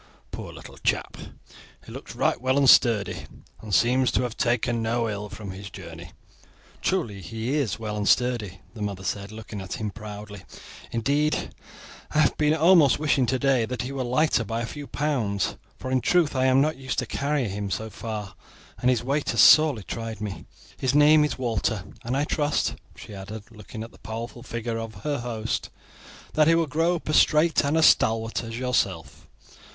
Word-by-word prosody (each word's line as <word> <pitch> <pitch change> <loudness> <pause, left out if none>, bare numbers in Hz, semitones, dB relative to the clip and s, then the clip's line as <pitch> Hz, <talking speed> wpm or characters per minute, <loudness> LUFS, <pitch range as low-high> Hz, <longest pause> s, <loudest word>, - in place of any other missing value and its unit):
Poor - - -7
little - - -12
chap! - - 0 0.7
He - - -11
looks - - -9
right - - +1
well 130 +1 +1
and 140 -1 +4
sturdy, 105 -8 +4 0.3
and 110 - -8
seems 125 +8 +3
to 105 - +2
have 120 -1 -3
taken 120 -1 0
no 115 +1 0
ill 105 -1 -4
from 105 -1 -8
his 100 +1 -8
journey." 85 -2 -10 0.7
"Truly, 115 - -1
he 115 - -4
is 140 -9 0
well 110 -2 -4
and 105 -1 0
sturdy," 115 -7 +1
the 110 - -10
mother 100 -2 -4
said, 100 +3 -3
looking 110 -2 -8
at 95 - -6
him 105 -2 -3
proudly; 105 -1 -9 0.5
"indeed 145 +6 0 0.6
I - - -3
have 155 -2 +4
been 150 0 +2
almost 165 -3 +5
wishing 145 -4 +2
today 130 -1 +2
that 125 0 -3
he 130 - -5
were 135 -1 -3
lighter 125 +1 +2
by 115 +2 -3
a - - -2
few 145 +4 -8
pounds, 115 -10 -1 0.2
for 130 - -6
in 130 -1 +2
truth 165 +2 +2
I 130 0 +2
am 130 +1 +5
not 155 +1 +1
used 130 -1 -4
to 125 - 0
carry 140 +1 -1
him 100 0 -4
far, 105 0 -5 0.5
and 125 - +2
his 125 -2 +1
weight 140 +3 -1
has - - +3
sorely 150 -9 +6
tried 115 0 -5
me. 105 -2 -6 0.3
His 130 +1 0
name 150 +1 +6
is 150 - -1
Walter, 115 -4 -1 0.2
and 125 +3 -1
I 145 - +1
trust," 150 0 0 0.2
she - - -11
added, 105 +3 -9
looking 110 0 -9
at 115 - -10
the - - -19
powerful 115 +3 -6
figure 115 -2 -4
of 115 -1 -6
her 145 -3 -1
host, 115 -2 -3 0.6
"that 155 -1 +4
he 165 - +5
will 165 0 +2
grow 165 +4 +1
up 165 - -7
as 155 - +3
straight 155 +1 +4
and 145 +3 +1
as 160 - +5
stalwart 115 +1 +3
as 115 0 -6
yourself." 125 0 -2
120 Hz, 190 wpm, -25 LUFS, 105-140 Hz, 0.7 s, sorely